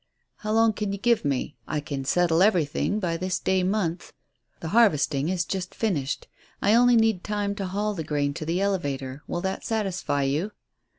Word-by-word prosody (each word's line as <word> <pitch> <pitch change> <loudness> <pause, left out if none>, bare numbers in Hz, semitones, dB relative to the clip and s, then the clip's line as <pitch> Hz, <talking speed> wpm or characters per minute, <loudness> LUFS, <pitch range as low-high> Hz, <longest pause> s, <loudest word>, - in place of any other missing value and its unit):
"How 215 - -4
long 225 0 +4
can 210 -1 -3
you 200 - -3
give 235 +3 +2
me? 140 0 -2
I 150 - -1
can 140 -2 -5
settle 170 +2 +3
everything 190 0 +2
by 170 -4 -1
this 185 +1 -1
day 190 0 +1
month. 180 -3 -1 0.5
The 160 - -5
harvesting 155 -9 +3
is 180 -2 0
just 185 0 -4
finished. 155 -11 -1 0.3
I 205 - +3
only 245 +1 +6
need 225 -5 +3
time 205 -1 -1
to 195 - -3
haul 205 +3 -1
the 165 -5 -4
grain 145 -1 -1
to 155 - -5
the 175 +3 0
elevator. 140 -9 -2
Will 175 - -3
that 190 +1 -3
satisfy 190 -10 -1
you?" 155 +10 -1
185 Hz, 185 wpm, -26 LUFS, 150-210 Hz, 0.5 s, only